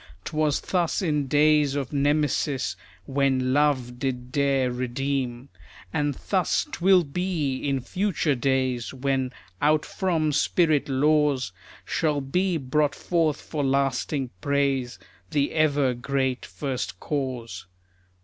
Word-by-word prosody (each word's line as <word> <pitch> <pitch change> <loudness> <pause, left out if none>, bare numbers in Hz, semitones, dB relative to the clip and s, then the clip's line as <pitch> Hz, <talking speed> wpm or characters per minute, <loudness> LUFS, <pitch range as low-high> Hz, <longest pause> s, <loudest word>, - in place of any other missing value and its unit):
'Twas 155 -2 +1
thus 180 +1 0
in 150 -5 0
days 150 0 +3
of 140 -1 -3
Nemesis, 145 - +1 0.3
When 130 -2 +1
Love 130 -4 +1
did 125 -2 -3
dare 135 -2 +2
redeem. 125 +1 -2 0.4
And 145 -2 0
thus 185 +5 0
'twill 185 - +4
be 155 -3 -2
in 135 -1 -1
future 180 +1 0
days, 130 -1 0
When 130 -1 -1 0.3
out 150 +1 +3
from 165 -5 0
spirit 155 -1 +2
laws, 145 -4 +2 0.3
Shall 150 -3 0
be 175 +6 0
brought 145 +1 0
forth 165 -3 0
for 150 -3 -4
lasting 135 0 0
praise 140 -3 0 0.3
The 145 -3 +1
ever 145 -4 +2
great 130 +1 -2
First 135 -4 -4
Cause. 130 -8 -4
140 Hz, 115 wpm, -25 LUFS, 130-150 Hz, 0.4 s, twill